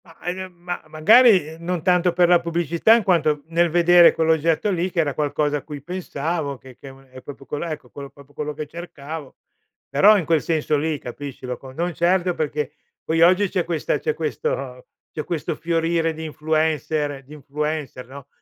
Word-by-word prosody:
Ma, 165 -2 -18
ehm, 175 - -2 0.2
gl - - -25
ma, 175 0 -4
magari, 185 - +5
ehm, 160 +1 -11
non 175 -2 -2
tanto 180 0 +3
per 175 0 +3
la 175 0 +5
pubblicità, 170 +5 +2
in 230 - +1
quanto 155 -6 +1
nel 170 +1 +2
vedere 175 +1 +6
quell'oggetto 160 +4 +1
lì, 180 0 -1
che 175 - -3
era 150 -4 +1
qualcosa 150 0 0
a - - -6
cui 145 -1 -9
pensavo, 160 -4 -3
che 130 0 -15
che 135 - -12
u 135 0 -15
è 130 0 -13
proprio 140 0 -11
quel 150 - -4
ecco, 160 -3 -6
quello 140 -1 -9
proprio 140 0 -18
quello 150 +1 -4
che 155 +1 -6
cercavo. 155 -2 -9 0.5
Però 200 +10 +6
in 180 - -2
quel 160 -2 +2
senso 155 -2 0
lì, 155 +1 -1
capisci, 135 +2 -8
lo 125 -1 -4
con 130 -1 -13
non 175 +3 -2
certo 180 +2 +1
perché 150 -3 -3 0.3
poi 165 +1 0
oggi, 185 +4 +5
c'è 185 -2 0
questa 165 -2 -2
c'è 460 - -1
questo - - -4 0.2
c'è - - -4
questo 170 -4 -3
fiorire 165 0 0
di 160 +1 -8
influencer 155 -2 -1
di 140 +3 -14
influencer, 150 -3 -4
no 140 +1 -11
160 Hz, 195 wpm, -22 LUFS, 145-175 Hz, 0.5 s, vedere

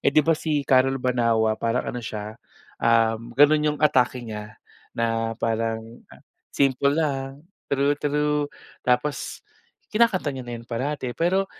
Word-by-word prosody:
eh - - +3
'di 155 - +3
ba 165 - +4
si 150 -2 -1
Carol 135 0 +3
Banawa 115 -4 +1
parang 115 +2 0
ano 125 - -4
siya, 105 -1 -6 0.5
um, 115 0 +2
gano'n 150 +2 +6
'yong 150 -1 0
atake 125 -3 +2
niya, 105 -1 -7 0.4
na 115 -1 -1
parang 115 0 -2 0.5
simple 140 +1 +2
lang, 140 -1 -2 0.2
true 140 +1 +2
true, 150 0 0 0.3
tapos, 125 +2 -1 0.5
kinakanta 190 -11 +2
niya 130 - -6
na 120 0 -8
'yan 115 - -13
parati 130 +1 -3
pero, 190 +3 +1
130 Hz, 140 wpm, -24 LUFS, 115-145 Hz, 0.5 s, gano'n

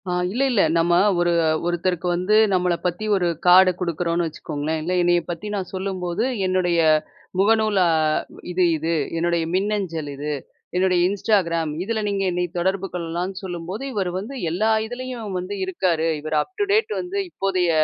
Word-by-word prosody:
ஆ - - 0 0.2
இல்ல, 245 +8 0
இல்ல. 220 -5 +3 0.2
நம்ம 170 +1 +2 0.3
ஒரு 175 0 +2 0.3
ஒருத்தருக்கு 175 0 -1
வந்து 185 +4 +1 0.2
நம்மள 180 -1 +2
பத்தி 180 +4 -1
ஒரு 180 -3 +1 0.2
கார்டு 185 +1 +8
குடுக்குறோம்னு 170 -1 -1
வச்சுக்கோங்களேன். 155 0 -4
இல்ல 180 +3 -1
என்னைய 175 0 +3
பத்தி 175 +5 -6
நான் 190 -3 -4
சொல்லும்போது 185 -2 -2 0.2
என்னுடைய 180 -2 +1 0.6
முகநூல் 215 0 +3
அ - - +3 0.6
இது, 180 +1 +1
இது 160 +2 -1 0.2
என்னுடைய 170 0 +1
மின்னஞ்சல் 190 -6 -1
இது, 145 +2 -4 0.4
என்னுடைய 185 -1 +3
இன்ஸ்டாகிராம் 180 -6 +1
இதில 220 +2 -2
நீங்க 200 -1 -1
என்னை 180 0 0
தொடர்பு 190 +2 0
கொள்ளலாம்ன்னு 180 +3 -4
சொல்லும்போது, 180 +5 -5
இவர் 195 -4 -1
வந்து 230 +8 -7 0.2
எல்லா 215 +6 +1
இதுலயும் 245 -4 -6
வந்து 185 +3 -5
இருக்காரு 175 -3 0
இவரு 155 0 -1
அப்டு 410 +2 -3
டேட் 435 +1 +2
வந்து 360 +2 -5
இப்போதைய 185 - 0
180 Hz, 150 wpm, -22 LUFS, 170-200 Hz, 0.6 s, கார்டு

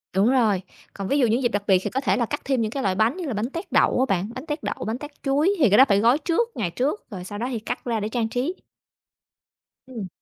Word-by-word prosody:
Đúng 200 +4 +4
rồi. 220 -8 +3 0.3
Còn 195 -1 -5
ví 280 - +1
dụ 250 - +4
những 230 +4 +1
dịp 240 - +2
đặc 205 -2 -2
biệt 190 -3 +5
thì - - -2
có 265 - -2
thể - - +1
là 240 - +1
cắt - - -4
thêm 265 -3 +1
những 215 - -1
cái 270 +2 -3
loại 190 -1 +1
bánh 225 - +2
như 365 - -4
là 260 - -2
bánh 220 +4 -2
tét 335 +6 -7
đậu - - +3
á 260 - +4
bạn. 185 +4 -3
Bánh 255 - -7
tét 300 -1 -4
đậu, - - -2
bánh 225 +2 -2
tét 295 +1 -11
chuối 290 +6 +2
thì 260 - +5
cái 205 - +5
đó 265 - +9
phải 200 0 +4
gói 235 +5 +4
trước 335 +10 0
ngày 185 - -1
trước, 280 - -1
rồi 185 -4 -7
sau 205 +2 -7
đó 240 +3 -2
thì 235 - -2
cắt 215 - -5
ra 230 -2 0
để 210 +1 -3
trang 225 -1 -1
trí. 260 +10 -2 1.3
Ừm. 225 -7 -6
240 Hz, 295 wpm, -24 LUFS, 210-275 Hz, 1.3 s, đó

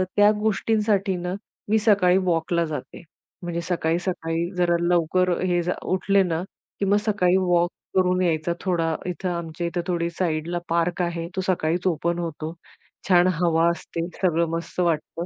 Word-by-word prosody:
त्या 205 0 +6
गोष्टींसाठी 210 -2 +1
ना, 180 +1 -3 0.4
मी 220 +1 +4
सकाळी 200 -4 +4
वॉकला 170 0 +1
जाते, 150 -5 -6 0.4
म्हणजे 170 -1 -3
सकाळी-सकाळी 170 0 -1
जरा 175 -1 +2
लवकर 175 +1 +2
हे, 175 -1 +1
जा 180 +1 0 0.2
उठले 195 +1 +3
ना, 170 -2 -1 0.4
की 200 - +1
मग 200 +1 +3
सकाळी 190 -3 +3
वॉक 175 -2 +2 0.3
करून 185 -1 +3
यायचा 170 -1 +1
थोडा. 165 -4 0
इथं 180 +1 -3
आमच्या 170 -1 -4
इथे 175 +1 -2
थोडी 170 -2 0
साइडला 170 0 -1
पार्क 170 +1 +1
आहे. 170 -1 -2
तो 190 - 0
सकाळीच 175 0 0
ओपन 170 0 0
होतो. 160 -1 -4 0.6
छान 180 -1 +6
हवा 165 -1 +3
असते, 170 0 -5 0.2
सगळं 170 -3 +2
मस्त 165 +2 -5
वाटतं. 170 0 -1
175 Hz, 155 wpm, -24 LUFS, 165-185 Hz, 0.6 s, त्या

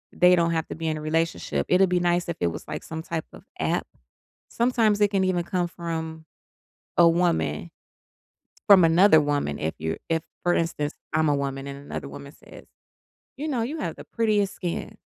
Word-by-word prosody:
they 180 +1 +6
don't 170 0 +2
have 160 -1 0
to - - -4
be 160 +1 -4
in 155 - -1
a - - -6
relationship, 165 +2 -1
it'd 185 +1 +4
be 180 0 +2
nice 175 0 +1
if 170 - -3
it 85 - +1
was, 85 - -5
like, - - -5
some 160 0 -6
type 165 -2 -4
of - - -13 0.2
app, - - 0 0.6
sometimes 230 -4 +2
it 205 - +5
can 195 -1 +2
even 180 -2 +1
come 175 0 -1
from 160 -2 -5 0.7
a 170 - +8
woman 170 0 0 1.0
from 195 -4 +8
another 165 0 +6
woman 145 - -1
if 80 +1 -2
you 80 +1 -2
if, 165 -1 +1 0.2
for 175 - +3
instance, 160 -3 -1 0.2
I'm 155 0 +3
a 145 - +3
woman 135 -1 -3
and 140 0 -7
another 140 0 -6
woman 140 +1 -10
says, - - -15 0.7
"You 300 - -3
know, 255 -6 -1
you 285 +8 -4
have - - -3
the - - -10
prettiest 210 -4 +1
skin, 175 -2 -4
170 Hz, 195 wpm, -25 LUFS, 155-185 Hz, 1.0 s, a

